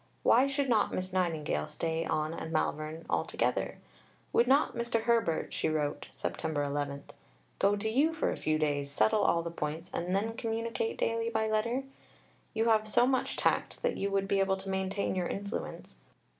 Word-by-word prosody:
Why 255 +4 +5
should 275 0 0
not 225 -4 +3
Miss 185 0 -3
Nightingale 160 - 0
stay 165 0 -2
on 155 +1 -1
at 160 - -5
Malvern 155 0 -2
altogether? - - 0 0.6
"Would 240 - +4
not 275 +3 +4
Mr. 235 -1 0
Herbert," 230 -8 +1
she - - 0
wrote 150 -2 -1
(Sept. - - -4
11), 145 -2 -1 0.6
"go 200 +1 +4
to 205 +2 -2
you 275 +9 +3
for 320 -1 0
a - - -2
few 155 0 0
days, 145 -2 0
settle 215 +9 +3
all 170 -4 +3
the 170 - -4
points, 160 +1 -4
and 180 +2 -1
then 220 +3 0
communicate 230 0 -2
daily 230 0 0
by 220 -1 0
letter? 235 +5 0 0.7
You 225 0 +2
have 215 -1 +3
so 240 +3 +4
much 260 0 0
tact - - 0
that - - +1
you 200 - -1
would 195 0 0
be 195 0 +2
able 195 0 +2
to 195 0 -8
maintain 190 +1 -1
your 180 -2 -1
influence. 200 +2 -5
195 Hz, 180 wpm, -31 LUFS, 160-230 Hz, 0.7 s, Why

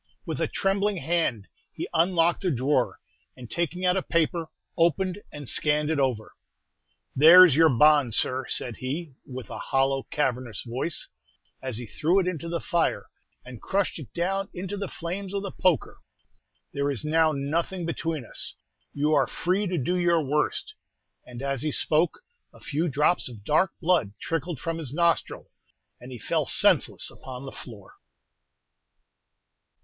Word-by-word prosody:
With - - -4
a - - +1
trembling 195 +1 0
hand 160 - -1 0.2
he - - -5
unlocked 170 +1 +2
a 185 - +1
drawer, 130 -2 0 0.4
and 125 -3 -11
taking 175 +2 -2
out 180 0 +3
a 190 - +1
paper, 165 -1 0 0.3
opened 180 +3 +1
and 145 -2 -8
scanned 150 +3 +2
it 155 - 0
over. 125 -6 -1 0.8
"There's 165 +2 +9
your 160 +1 +6
bond, 145 -2 +4
sir," 130 0 0
said 120 -3 +3
he, 145 +4 -5
with 130 -4 -8
a - - -6
hollow, 135 0 +1
cavernous 130 - -2
voice, 130 +7 -4 0.5
as 130 -4 -3
he 120 - -6
threw 155 - +1
it 190 - 0
into 170 -2 -3
the 170 0 -2
fire, 170 0 -1 0.3
and 125 -3 -10
crushed 195 -3 -1
it 145 - -10
down 195 +3 -2
into 190 +3 -4
the 200 -1 -4
flames 185 +4 -5
with 200 0 -2
a 195 - -4
poker. 180 -5 0 0.7
"There 140 0 -1
is 140 +1 -2
now 160 +1 +3
nothing 165 +5 -2
between 165 -4 -3
us. - - -4 0.4
You 150 +2 +1
are 140 -3 +3
free 190 +4 -1
to 180 -1 -2
do 160 +6 0
your 170 -2 +2
worst!" 150 +2 -1 0.5
And 125 +1 -8
as 140 -2 -2
he 155 - -1
spoke, 160 - 0 0.3
a - - -18
few 160 +4 -2
drops 150 +2 +1
of 110 -5 -12
dark 155 - +2
blood 165 - +1
trickled 165 -2 -3
from 165 +2 -3
his 145 -3 -5
nostril, 170 -1 0 0.5
and 125 +2 -11
he 125 - -7
fell - - -1
senseless - - +3
upon 130 0 -9
the 135 - -7
floor. 105 -6 -12
155 Hz, 160 wpm, -26 LUFS, 130-175 Hz, 0.8 s, There's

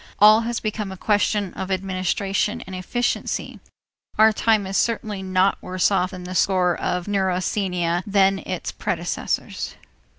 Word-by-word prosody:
All 215 +2 +7
has 235 0 -2
become 210 -2 -3
a 190 - -8
question 205 -1 +1
of 190 - -5
administration 195 +4 -1
and 190 -5 -8
efficiency. 240 +7 -2 0.6
Our 220 0 +6
time 215 -2 +2
is 190 +1 -4
certainly 215 -3 0
not 190 +1 +1
worse 185 +1 +1
off 185 -2 +1
on 185 -1 -8
the 180 +1 -6
score 180 -2 +2
of 180 +1 -2
neurasthenia 185 -3 0
than 195 -1 +3
its - - -4
predecessors. - - -3
195 Hz, 140 wpm, -23 LUFS, 185-210 Hz, 0.6 s, All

